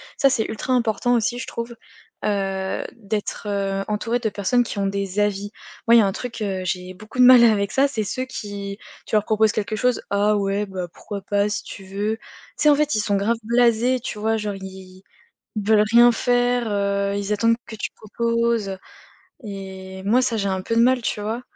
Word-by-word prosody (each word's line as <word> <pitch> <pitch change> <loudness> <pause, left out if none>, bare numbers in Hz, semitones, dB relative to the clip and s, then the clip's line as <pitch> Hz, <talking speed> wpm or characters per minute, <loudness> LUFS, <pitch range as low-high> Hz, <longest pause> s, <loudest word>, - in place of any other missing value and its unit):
Ça, 275 - +4
c'est 235 -5 0
ultra 220 +4 -2
important 245 0 +2
aussi 240 +1 0
je 240 - -6
trouve, 235 0 -5 0.5
heu, 195 -2 -1
d'être, 210 -1 -4
heu, 195 -1 -1
entouré 225 +3 -1
de 225 -2 -1
personnes 210 +5 +1
qui 230 - -7
ont 200 - 0
des 195 0 -2
avis. 205 0 0 0.4
Moi, 235 - +7
il - - +9
y - - +7
a 205 - +3
un 195 - +1
truc, 240 +3 -6
heu, 190 -2 -2
j'ai 180 0 -3
beaucoup 215 +6 -12
de 250 - +6
mal 250 -1 +9
avec 205 -3 +3
ça, 275 +1 +3
c'est 230 -6 -2
ceux 255 +5 -3
qui 200 -5 -6 0.3
tu - - -1
leur 210 -1 +3
proposes 220 0 +3
quelque 215 0 -2
chose: 250 +2 0
«Ah 205 +1 +3
ouais 200 +1 -1
bah 185 -2 -5
pourquoi 205 -2 -7
pas? 205 +1 0
Si 205 - -3
tu 195 - -10
veux.» 205 +3 -2
Tu - - -34 0.4
sais 300 - +4
en 295 - +6
fait, 300 0 +1
ils 215 - +1
sont 205 -1 0
grave 215 +4 +1
blasés, 235 +2 +3
tu 215 - -6
vois? 220 +1 +1
Genre 210 -1 -3
ils 190 -1 -10 0.6
ils 210 0 -4
veulent 215 -1 +5
rien 240 +1 +8
faire, 245 0 +1
heu, 200 0 0
ils 205 +1 -1
attendent 230 +2 +3
que 220 - -8
tu 210 - -4
proposes, 230 -1 0
heu 190 - -5 0.7
et 190 -2 -8
moi 235 +6 +3
ça 235 -3 0
j'ai 200 -1 0
un 190 -1 -1
peu 230 - -2
de 230 - +5
mal, 250 +1 +4
tu 215 - -2
vois? 225 +4 -3
210 Hz, 220 wpm, -22 LUFS, 200-235 Hz, 0.7 s, il